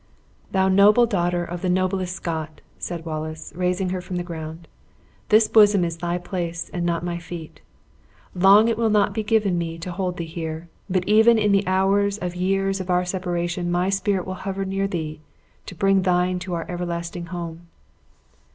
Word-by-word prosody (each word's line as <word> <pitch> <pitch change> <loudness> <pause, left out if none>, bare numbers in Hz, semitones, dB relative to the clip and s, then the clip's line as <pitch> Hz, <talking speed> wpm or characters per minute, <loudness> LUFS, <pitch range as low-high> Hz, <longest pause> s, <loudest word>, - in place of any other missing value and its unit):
"Thou 190 -1 +2
noble 205 +5 +6
daughter 175 -5 0
of 175 0 -6
the 185 - -1
noblest 185 0 0
Scot!" 160 -3 -5 0.2
said 170 -2 -5
Wallace, 155 0 -5
raising 180 +1 0
her 185 0 -2
from 180 +1 -6
the 175 - -2
ground, 165 -1 -7 0.6
"this 215 0 +5
bosom 205 -4 +5
is 165 -1 -4
thy 175 +1 -2
place, 175 -2 -4
and 175 - -2
not 170 -1 0
my 175 -1 -3
feet. 170 -2 -9 0.7
Long 195 +4 +6
it 230 -1 0
will 225 -1 +2
not 205 -1 +2
be 220 - -1
given 210 -4 +1
me 165 -1 -4
to 170 +2 -6
hold 180 0 -3
thee 170 - -3
here; 160 0 -6 0.2
but 185 -1 0
even 220 +2 +6
in 210 -1 +2
the 200 0 +2
hours 195 +2 +2
of 180 -3 -4
years 195 +1 0
of 185 - -8
our 180 0 +2
separation 175 -1 -2
my 180 +2 +1
spirit 195 -1 0
will 185 - -4
hover 195 0 -3
near 195 +1 -1
thee, 155 -5 -4 0.5
to - - -8
bear 195 +3 +2
thine 180 -1 +2
to 180 0 -4
our 165 - -3
everlasting 170 -1 -4
home." 170 -1 -7
180 Hz, 185 wpm, -23 LUFS, 170-195 Hz, 0.7 s, noble